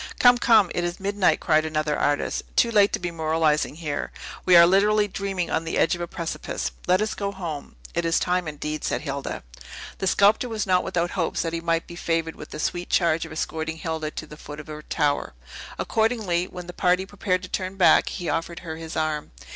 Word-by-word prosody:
"Come, 245 -1 +6
come; 220 -7 +5
it 175 - -1
is 175 +1 -3
midnight," 200 0 +2
cried 155 -2 +3
another 155 -1 -1
artist, 145 0 0
"too 235 - +4
late 205 -2 +5
to - - +2
be 175 -1 -3
moralizing 160 -2 +1
here. 155 -3 -4 0.4
We 180 - +7
are 170 0 +10
literally 205 +3 +4
dreaming 195 -3 -3
on 160 - 0
the 165 - -3
edge - - +3
of 175 - -3
a 175 - -2
precipice. 165 - -4 0.2
Let 185 +3 +4
us 215 - -2
go 200 -1 -3
home." 170 -7 -6 0.2
"It 170 - 0
is 165 0 +2
time, 180 -1 0
indeed," 150 0 -4
said - - -1
Hilda. 140 -2 -4 0.6
The 190 - -1
sculptor 205 +6 +4
was 220 -3 -2
not 185 -2 +3
without 175 -2 -1
hopes 170 -4 -1
that 165 -1 -3
he 165 - -2
might 165 0 0
be 170 - -10
favored 165 -1 -1
with 150 - -10
the - - -7
sweet 175 +2 -2
charge 165 -2 +2
of - - -13
escorting 160 0 -3
Hilda 160 -1 -3
to 155 - -7
the 150 0 -12
foot 150 0 -9
of 150 - -8
her 155 -1 -8
tower. 145 - -1 0.4
Accordingly, 220 -6 0
when 180 -1 -9
the 180 - -8
party 180 +1 +2
prepared 190 -2 -1
to - - -6
turn 185 +1 -3
back, 190 - +5
he 175 -3 -5
offered 165 +1 -2
her 160 -2 -6
his 160 0 -7
arm. 155 -1 -1
170 Hz, 220 wpm, -24 LUFS, 160-190 Hz, 0.6 s, are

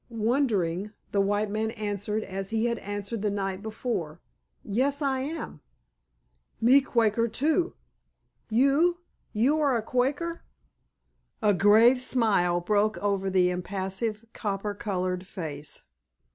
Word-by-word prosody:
Wondering, 215 -5 0 0.2
the 200 - +2
white 205 +1 0
man 220 +1 -1
answered 210 0 -3
as 195 0 -4
he 225 +1 0
had 235 -1 0
answered 205 +2 -4
the 210 - +1
night 195 -1 -3
before, 215 -7 -4 0.4
"Yes, 265 +7 0
I 275 -3 0
am." 285 - -5 1.0
"Me 255 +5 +6
Quaker 230 -3 +1
too." 310 +10 0 0.7
"You? 280 +9 +3 0.3
You 270 +8 +2
a 270 -5 +2
Quaker?" 280 +9 -1 1.0
A 210 -1 +5
grave 220 +6 +5
smile 205 -9 +2
broke 210 +3 +1
over 200 -1 0
the 180 -1 +3
impassive, 195 +4 -3
copper 205 -1 -3
colored 185 -2 -3
face. 150 -6 -7
215 Hz, 115 wpm, -27 LUFS, 195-245 Hz, 1.0 s, Me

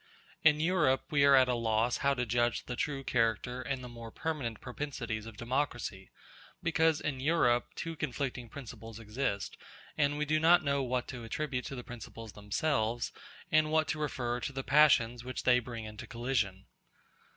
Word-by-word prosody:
In 150 -1 +6
Europe 155 -5 +3
we 145 -2 +4
are 140 -1 +7
at 130 -1 +6
a 125 - +1
loss 115 0 +1
how 140 0 +2
to 125 -1 -1
judge 120 +1 +1
the 125 - -4
true 140 -2 -2
character 125 +1 0
and 130 0 -3
the - - -6
more 115 -1 -9
permanent 130 -5 -3
propensities 125 -5 -4
of 110 -2 -10
democracy, 120 -5 -2 0.5
because 160 -2 +3
in 140 -4 -2
Europe 130 -5 +3
two 165 0 -4
conflicting 130 -4 -3
principles 115 -4 -9
exist, 105 -2 -3 0.4
and 145 0 +2
we 150 - 0
do 155 +1 +2
not 165 +2 +6
know 140 -1 +1
what 125 -1 -1
to 125 -3 -6
attribute 125 +2 -3
to 135 - -5
the 125 - -6
principles 115 -2 -9
themselves, 110 +2 -1 0.4
and 155 0 +4
what 155 0 +2
to 155 - -1
refer 125 -5 -1
to 130 - -3
the 135 0 -4
passions 125 -5 +4
which 130 0 -5
they 125 -1 +5
bring 115 -2 -6
into 105 0 -8
collision. 110 -6 -1
125 Hz, 175 wpm, -32 LUFS, 115-145 Hz, 0.5 s, are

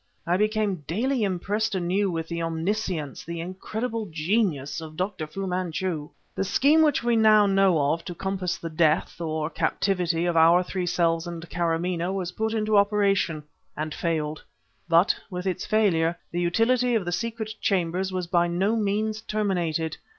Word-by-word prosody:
I 175 - +2
became 210 -4 0
daily 245 - 0
impressed 205 +2 -1
anew 190 +3 +1
with 165 -2 -3
the 170 0 -3
omniscience, 165 -2 -2
the 170 +1 -6
incredible 215 +6 -4
genius, 160 -3 0
of 155 -1 -9
Dr. 185 -4 -3
Fu 195 +5 -5
Manchu. 180 -3 -2 0.2
"The - - -1
scheme 285 +11 +4
which 300 -6 +3
we 240 -1 +2
know 200 -5 +5
of 150 +4 0
to 175 - -6
compass 185 -1 -2
the 165 - -6
death, 160 +1 +1
or 155 -2 -2
captivity, 175 -1 0
of 175 -1 0
our 165 +2 +6
three 180 0 -3
selves 170 -1 +1
and 170 0 -7
Kâramaneh 170 +1 -1
was 180 -2 -3
put 220 +4 -2
into 215 -1 +2
operation, 200 -6 +2 0.3
and 155 0 -3
failed. 155 -2 -2 0.5
But, 170 +4 +4
with 180 -1 -5
its 185 -1 -2
failure, 175 -6 +2
the 175 - -1
utility 235 +7 +2
of 210 -5 0
the 175 - -2
secret 220 +2 -3
chambers 185 0 0
was 185 -1 -2
by 175 0 +2
no 190 +6 +1
means 215 0 -1
terminated. 175 -7 -1
180 Hz, 160 wpm, -25 LUFS, 165-210 Hz, 0.5 s, our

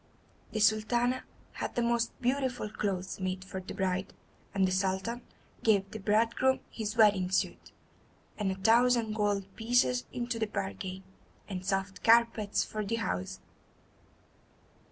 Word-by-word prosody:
The 215 - -2
Sultana 235 +4 +2 0.3
had - - -5
the 240 - +1
most 235 0 0
beautiful 255 -4 0
clothes 190 -4 -3
made 185 0 -3
for 190 -1 -6
the 185 - -8
bride, 190 0 -1 0.4
and 195 -1 +2
the - - -1
Sultan 190 +5 -1 0.4
gave 200 -3 +2
the 220 - -6
bridegroom 230 +6 +2
his 220 0 -4
wedding 200 -5 +5
suit, 185 - -1 0.6
and 205 -3 -1
a - - -2
thousand 230 +2 +3
gold 205 -2 0
pieces 245 +2 +2
into 240 -1 -3
the 220 - 0
bargain, 185 - -4 0.4
and 185 -3 -5
soft 195 0 -2
carpets 230 -2 +4
for 215 0 -4
the 210 +3 -1
house. 95 - -3
215 Hz, 135 wpm, -30 LUFS, 190-235 Hz, 0.6 s, wedding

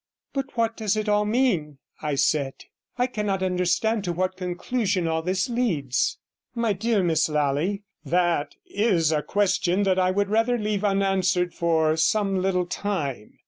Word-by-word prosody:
'But 270 -2 -4
what 230 0 +1
does 215 -1 0
it 215 0 -2
all 210 0 +2
mean?' 210 - +1 0.2
I 150 -2 -1
said. 140 -1 +1 0.4
'I 250 - +2
cannot 210 -6 -2
understand 185 +4 +1
to 175 - -1
what 185 +2 -1
conclusion 185 +1 -1
all 160 0 0
this 185 +2 0
leads.' 180 - 0 0.4
50 - - -5
'My 230 -3 +2
dear 210 0 +1
Miss 160 -2 +2
Lally, 150 +7 0 0.2
that 175 -4 0
is 190 -7 +1
a 150 -1 +1
question 195 0 +1
that 190 -1 +2
I 185 0 +3
would 200 +1 0
rather 225 +3 +2
leave 210 -2 -2
unanswered 190 -3 +1
for 160 -2 +2
some 195 +3 +2
little 180 -1 +1
time. 165 - -4
185 Hz, 160 wpm, -25 LUFS, 170-210 Hz, 0.4 s, I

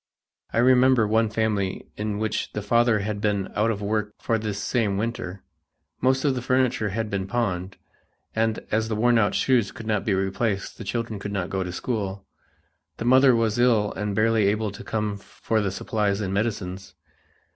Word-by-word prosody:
I - - -3
remember 125 -1 +5
one 110 +1 +2
family 105 -3 -1
in 105 -1 -3
which 110 0 -2
the 105 - -3
father 115 0 +3
had 105 0 -3
been 100 -2 0
out 110 +2 +2
of 105 -2 -2
work 105 0 -1
for 115 -1 0
this 105 -2 -3
same 105 0 0
winter, 110 -4 -4 0.6
most 130 +2 +2
of 140 - +3
the 125 - -3
furniture 125 -4 +1
had 110 +1 -3
been 95 -1 -2
pawned, 95 -5 -2 0.6
and 110 0 0
as 110 +1 +1
the 110 - -1
worn 120 +2 +3
out 105 -2 +2
shoes 125 -6 +2
could 115 - -10
not 105 -2 0
be 100 - +1
replaced 95 +2 -2
the - - -5
children 115 -3 -3
could 100 0 -5
not 90 -3 -3
go 95 -1 -1
to 90 - -5
school. 100 -1 -3 0.7
The 115 - -4
mother 130 +1 +6
was 115 0 +1
ill 115 -4 +3
and 105 -1 -3
barely 110 -1 +3
able 105 +1 0
to 100 - -10
come 105 -2 -2
for 110 +2 -2
the 100 - 0
supplies 100 +1 -1
and 95 -3 -2
medicines. 100 -3 -3
110 Hz, 190 wpm, -25 LUFS, 100-115 Hz, 0.7 s, mother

